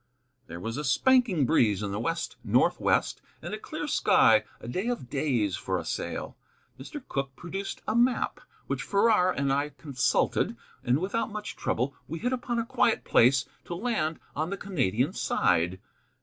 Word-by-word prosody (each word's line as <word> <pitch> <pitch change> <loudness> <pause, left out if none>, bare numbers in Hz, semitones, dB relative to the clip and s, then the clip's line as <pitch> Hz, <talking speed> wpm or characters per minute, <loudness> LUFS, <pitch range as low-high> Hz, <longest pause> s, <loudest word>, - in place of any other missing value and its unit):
There 85 +1 -7
was 115 +6 -4
a 150 - -3
spanking 200 - +3
breeze 105 -4 +3
in 100 - -2
the 100 - -2
west 165 +7 -2
northwest, - - +2 0.2
and - - -7
a - - -4
clear - - -5
sky, - - +4
a - - -10
day 185 - -2
of 240 - -3
days 120 - 0
for - - -2
a - - -5
sail. - - -4 0.4
Mr. 255 - -8
Cooke 135 -1 -3
produced 195 +3 -6
a 215 - 0
map, 240 +1 +2 0.3
which - - -2
Farrar 200 -2 +3
and 140 -4 0
I 145 +2 0
consulted, 140 -3 0 0.3
and 125 +2 +2
without 200 +9 -1
much 210 0 -6
trouble 130 +4 -1
we 165 - -4
hit 245 +8 -1
upon 245 -1 -2
a 230 - 0
quiet 240 -1 +2
place 125 +3 +4 0.2
to 175 - -5
land 170 -7 -1 0.2
on 155 +3 -1
the 200 - -3
Canadian 135 - 0
side. 90 - +1
155 Hz, 170 wpm, -28 LUFS, 125-215 Hz, 0.4 s, sky